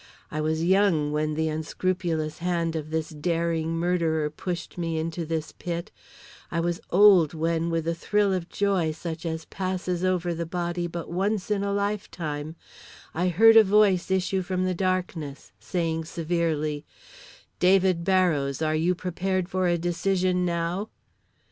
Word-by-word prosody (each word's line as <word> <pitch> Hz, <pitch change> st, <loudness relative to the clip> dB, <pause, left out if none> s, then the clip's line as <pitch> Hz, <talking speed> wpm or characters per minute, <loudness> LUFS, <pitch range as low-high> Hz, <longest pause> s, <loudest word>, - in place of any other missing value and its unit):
I 155 Hz, -, -2 dB
was 160 Hz, +1 st, 0 dB
young 180 Hz, -5 st, +3 dB
when 155 Hz, 0 st, -1 dB
the 160 Hz, +1 st, 0 dB
unscrupulous 160 Hz, 0 st, -2 dB
hand 170 Hz, -2 st, -1 dB
of 155 Hz, -1 st, -4 dB
this 160 Hz, 0 st, -2 dB
daring 165 Hz, +1 st, -1 dB
murderer 165 Hz, -3 st, 0 dB
pushed 175 Hz, +2 st, -5 dB
me 165 Hz, -2 st, -2 dB
into 165 Hz, +1 st, -3 dB
this 160 Hz, -1 st, -3 dB
pit; 170 Hz, -1 st, -5 dB, 0.6 s
I 170 Hz, -, -1 dB
was 170 Hz, 0 st, -1 dB
old 185 Hz, -5 st, +6 dB
when 165 Hz, +1 st, 0 dB
with 165 Hz, -1 st, -1 dB
a 170 Hz, -, +1 dB
thrill 200 Hz, +4 st, +1 dB
of 180 Hz, -2 st, -3 dB
joy 190 Hz, -6 st, +1 dB
such 165 Hz, +1 st, -5 dB
as 160 Hz, 0 st, -4 dB
passes 185 Hz, -1 st, -3 dB
over 180 Hz, -2 st, +1 dB
the 170 Hz, 0 st, -4 dB
body 175 Hz, 0 st, -2 dB
but 170 Hz, -1 st, -6 dB
once 195 Hz, +3 st, -1 dB
In 200 Hz, -1 st, +1 dB
a 200 Hz, -, -1 dB
life 200 Hz, +1 st, -1 dB
time, 155 Hz, -1 st, -5 dB, 0.6 s
I 175 Hz, +3 st, 0 dB
heard 225 Hz, +6 st, +6 dB
a 225 Hz, -, +10 dB
voice 200 Hz, -3 st, +3 dB
issue 190 Hz, 0 st, +1 dB
from 185 Hz, 0 st, -1 dB
the 185 Hz, -, 0 dB
darkness, 180 Hz, -6 st, -2 dB
saying 160 Hz, -, -2 dB
severely, 160 Hz, -3 st, -1 dB, 0.8 s
"David 185 Hz, -2 st, +4 dB
Barrows, 170 Hz, -8 st, +2 dB
are 155 Hz, -1 st, 0 dB
you 165 Hz, +4 st, +1 dB
prepared 185 Hz, +1 st, -2 dB
for 185 Hz, -1 st, 0 dB
a 175 Hz, 0 st, +2 dB
decision 180 Hz, +1 st, 0 dB
now?" 175 Hz, +4 st, -2 dB
170 Hz, 155 wpm, -26 LUFS, 160-185 Hz, 0.8 s, a